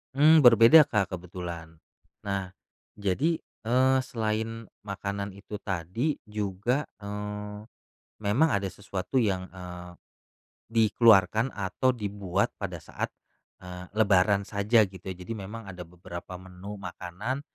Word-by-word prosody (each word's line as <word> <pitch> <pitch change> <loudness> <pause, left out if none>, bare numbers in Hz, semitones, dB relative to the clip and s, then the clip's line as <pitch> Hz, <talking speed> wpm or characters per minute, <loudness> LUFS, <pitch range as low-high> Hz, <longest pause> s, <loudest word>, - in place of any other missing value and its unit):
Mmm, 155 +3 +7
berbeda 120 +4 +8
Kak 100 -3 0
kebetulan. 85 -2 -7 0.5
Nah 100 -2 -2 0.5
jadi, 105 - +1 0.2
eee, 130 +3 +3
selain 115 -2 -3 0.2
makanan 100 0 -4
itu 105 +1 -8
tadi 95 - -2
juga, 105 +5 -1
eee, 105 0 -6 0.7
memang 120 +11 +3
ada 100 -9 0
sesuatu 95 +6 -2
yang, 95 -5 0
eee, 90 -1 -9 0.8
dikeluarkan 110 -1 +5
atau 125 +6 0
dibuat 100 -4 -1
pada - - -3
saat, - - -5 0.6
eee, 90 0 -8
lebaran 100 -1 +4
saja 105 +3 +3
gitu, 95 -1 -10
jadi 90 +3 -6
memang 110 +2 -7
ada 95 -2 -9
beberapa 90 +1 -9
menu 95 +3 -9
makanan 100 +6 -5
100 Hz, 115 wpm, -28 LUFS, 95-115 Hz, 0.8 s, berbeda